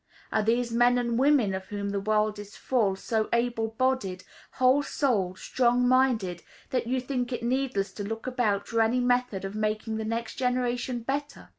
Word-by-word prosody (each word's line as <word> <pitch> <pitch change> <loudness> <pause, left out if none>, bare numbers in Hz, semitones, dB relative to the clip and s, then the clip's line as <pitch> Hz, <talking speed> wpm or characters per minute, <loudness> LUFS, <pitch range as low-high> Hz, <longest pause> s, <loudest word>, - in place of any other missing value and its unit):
Are 220 - +2
these 235 +2 +1
men 245 +1 +4
and 235 -1 0
women, 265 -8 +3
of 190 0 -5
whom 200 -1 -4
the 200 - -1
world 215 +1 +1
is 205 0 -10
full, 220 -7 +1
so 220 +2 -1
able 235 -1 +1
bodied, 220 -6 -1 0.3
whole 260 +2 +4
souled, 210 -11 0
strong 245 +2 +2
minded, 240 -9 +2 0.3
that 250 -2 -1
you 255 +2 +1
think 250 -1 -3
it 245 - -3
needless 240 -6 0
to 205 - -5
look 225 +2 -5
about 240 -6 0
for 230 0 +1
any 225 +3 +2
method 245 -5 +1
of 195 - -5
making 215 +1 -2
the 220 - -3
next 230 +1 -3
generation 250 -1 -1
better? 280 +4 -4
235 Hz, 180 wpm, -27 LUFS, 210-250 Hz, 0.3 s, men